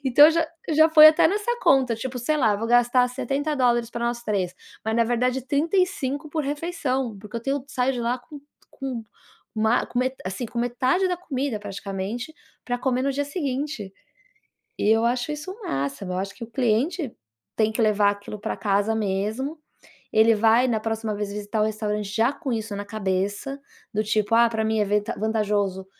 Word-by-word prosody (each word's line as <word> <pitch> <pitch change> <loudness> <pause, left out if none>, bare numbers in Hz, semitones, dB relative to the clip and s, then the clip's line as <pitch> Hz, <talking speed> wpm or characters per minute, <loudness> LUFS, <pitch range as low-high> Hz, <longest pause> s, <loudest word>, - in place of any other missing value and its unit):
Então, 270 +3 +8 0.4
eu 310 - 0
já 315 +1 +6
foi 310 -1 +10
até 310 +1 +4
nessa 420 +4 -1
conta, 260 -3 +4
tipo, 250 +3 -5
sei 275 +6 0
lá, 220 -8 +3
vou 225 - -3
gastar 245 +1 +4
$70 255 -3 0
para 235 0 -2
nós 235 0 -2
3, 185 -4 -1 0.3
mas 220 +1 0
na 235 - +4
verdade 250 +2 0
35 305 -2 0
por 310 0 -1
refeição, 280 -6 -2
porque 210 +3 -8
eu - - -3
tenho 275 0 -1
saio 260 -1 0
de 245 - -4
lá 240 +2 0
com 285 +4 -12 0.3
com, 255 -4 -5 1.2
assim, 190 +6 -4
com 235 - -6
metade 255 +10 +1
da 360 - -1
comida 275 -8 -3
praticamente 200 +6 -5 0.3
para 245 0 -2
comer 255 0 0
no 275 - +1
dia 285 +1 -1
seguinte. 280 - -3 0.9
E 210 - +1
eu 225 +1 +4
acho 245 +4 0
isso 300 +4 -6
um 440 - -14
máximo. 140 +7 -3
Eu 180 - -2
acho 195 +1 -3
que 235 - -7
o 230 - -14
cliente 255 - 0 0.4
tem 220 0 +2
que 230 - 0
levar 210 -2 +4
aquilo 205 +1 -7
para - - -3
casa 205 +1 +1
mesmo, 220 +9 -2 0.6
ele 220 +1 +6
vai 225 +4 +4
na 225 -3 +1
próxima 225 0 -2
vez 205 -1 -3
visitar 210 +1 -3
o - - +4
restaurante 210 -1 -2
já 230 +3 +3
com 280 -4 -5
isso 220 -2 -3
na 205 0 -5
cabeça, 205 +5 -2 0.3
do 215 +1 +1
tipo: 215 +1 0
"Ah, 235 0 +5
para 220 -1 -1
mim 220 0 +1
é 210 - +2
vent 205 +1 +1
vantajoso 205 -3 0
235 Hz, 185 wpm, -24 LUFS, 210-270 Hz, 1.2 s, foi